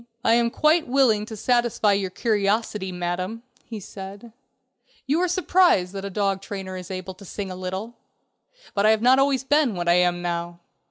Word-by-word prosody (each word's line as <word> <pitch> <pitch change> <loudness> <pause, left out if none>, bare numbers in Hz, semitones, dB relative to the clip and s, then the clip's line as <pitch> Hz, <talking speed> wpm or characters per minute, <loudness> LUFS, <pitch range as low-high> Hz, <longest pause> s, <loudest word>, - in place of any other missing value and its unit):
"I 225 - +5
am 235 0 +3
quite 310 +6 +2
willing 245 -5 +2
to 220 - -8
satisfy 240 -3 +2
your 195 -1 -1
curiosity, 210 -1 -1
Madam," 180 +5 -4 0.2
he 225 -2 -7
said; 200 +3 -10 0.7
"you 295 +5 +1
are 365 - +2
surprised 355 - +3
that 195 -1 -5
a 200 - -4
dog 195 -1 -1
trainer 195 -1 -6
is 180 -1 -8
able 185 0 -6
to 190 +2 -15
sing 195 0 -6
a - - -6
little. 190 +5 -5 0.8
But 200 +1 +2
I - - +6
have 220 0 +2
not 255 +2 +6
always 270 -1 +2
been 285 -5 +2
what 175 -1 -3
I 170 - +5
am 175 0 0
now. 170 0 -3
205 Hz, 185 wpm, -24 LUFS, 185-240 Hz, 0.8 s, I